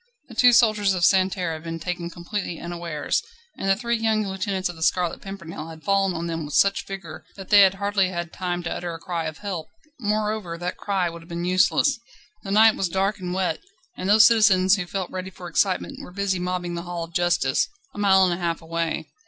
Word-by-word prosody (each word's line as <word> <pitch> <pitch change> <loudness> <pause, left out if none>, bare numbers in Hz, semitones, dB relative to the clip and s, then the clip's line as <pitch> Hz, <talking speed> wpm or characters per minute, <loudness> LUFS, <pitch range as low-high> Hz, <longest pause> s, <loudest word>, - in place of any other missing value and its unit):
The - - -10
two 245 +2 +6
soldiers 215 -5 +4
of 175 -2 +2
Santerne 185 -3 +2
had 155 - -7
been 165 0 -4
taken 175 0 -4
completely 175 0 -5
unawares, 170 -3 -2 0.3
and 195 - -3
the 195 - +5
three 235 +2 -1
young 220 -1 +1
lieutenants 190 0 -2
of 175 - -7
the 160 - -13
Scarlet 175 +1 +1
Pimpernel 170 -5 -8
had 160 -1 -11
fallen 195 -2 +2
on 165 +1 -3
them 165 -1 -3
with 145 0 -5
such 200 0 +3
vigour 195 -3 -8
that 195 -2 -10
they 205 -1 +9
had 195 -1 +5
hardly 200 -1 +1
had 175 -2 -5
time 175 -1 -3
to 170 - -3
utter 175 -1 -4
a - - -9
cry 170 -1 -3
of 155 0 -5
"Help!" 185 -6 -5 0.3
Moreover, 210 -5 -1
that 175 +1 -4
cry 195 -3 -1
would 170 0 -7
have 165 - -17
been 170 0 -4
useless. 185 +9 +3 0.4
The 195 - -8
night 220 +2 +6
was 190 - -1
dark 195 +3 0
and 180 -1 -4
wet, 185 0 -1 0.4
and 185 - -3
those 215 +1 +8
citizens 205 -4 +5
who 185 -4 -4
felt 190 0 -4
ready 185 0 -5
for 180 -1 -10
excitement 185 +2 0
were - - -10
busy 195 -1 -1
mobbing 180 -1 -3
the 170 - -3
Hall 175 -1 -5
of 165 0 -10
Justice, 175 -7 +2 0.3
a - - -8
mile 190 -2 +5
and 180 - +1
a - - -3
half 170 -1 -1
away. 165 -1 -3
185 Hz, 225 wpm, -24 LUFS, 170-200 Hz, 0.4 s, they